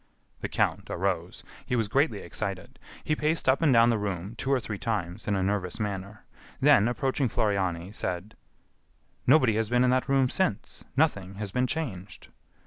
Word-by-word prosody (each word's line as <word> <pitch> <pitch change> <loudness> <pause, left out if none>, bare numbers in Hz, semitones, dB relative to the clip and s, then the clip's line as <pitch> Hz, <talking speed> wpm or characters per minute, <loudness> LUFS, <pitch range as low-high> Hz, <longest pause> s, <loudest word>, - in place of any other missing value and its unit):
The - - -4
count - - 0
arose. 90 -2 -2 0.2
He 125 - -2
was 115 -3 +1
greatly 115 -2 +1
excited. 100 -4 -5 0.2
He 155 - 0
paced 155 0 0
up 130 +3 +4
and 155 -4 +4
down 115 -1 +6
the 115 - 0
room, 100 0 -4
two 130 +4 -2
or 135 - +3
three 105 -3 -6
times, 105 -4 -3
in 105 - +1
a 95 - 0
nervous 95 0 -1
manner; 100 0 -5 0.3
then, 135 -7 +5
approaching 130 +1 0
Floriani, 95 -4 -1
said: 95 +2 -4 0.9
"Nobody 130 -4 +5
has 110 -1 0
been 120 +1 +3
in 125 - +4
that 130 +2 +1
room 135 -1 +4
since; 125 - -2
nothing 100 - +1
has 105 -1 -5
been 125 +4 +1
changed." 100 - -5
110 Hz, 175 wpm, -27 LUFS, 95-130 Hz, 0.9 s, down